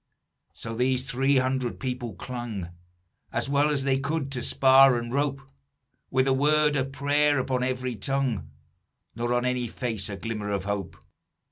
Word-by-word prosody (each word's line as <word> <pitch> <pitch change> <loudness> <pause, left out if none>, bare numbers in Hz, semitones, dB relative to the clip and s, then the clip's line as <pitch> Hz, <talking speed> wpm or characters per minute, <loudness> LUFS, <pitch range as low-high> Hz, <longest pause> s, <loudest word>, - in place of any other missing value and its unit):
"So 115 - -7
these 130 +2 0
three 135 +2 +2
hundred 130 -1 0
people 125 -5 -4
clung 120 -8 -5 0.6
As - - -2
well 145 +2 +2
as 145 -2 0
they 135 -1 +1
could, 140 0 -2
to 125 -2 -3
spar 135 -1 +6
and 120 0 -5
rope; 140 0 0 0.7
With 130 +1 +2
a 135 - +4
word 150 +2 +3
of 135 -1 -1
prayer 145 +1 +2
upon 130 -1 0
every 125 -1 -2
tongue, 120 - -1 0.7
Nor 120 +1 -2
on 120 0 +1
any 125 -1 0
face 110 -3 -3
a 100 - -5
glimmer 105 -2 -4
of 100 -2 -1
hope. 100 -2 -4
130 Hz, 160 wpm, -26 LUFS, 120-135 Hz, 0.7 s, spar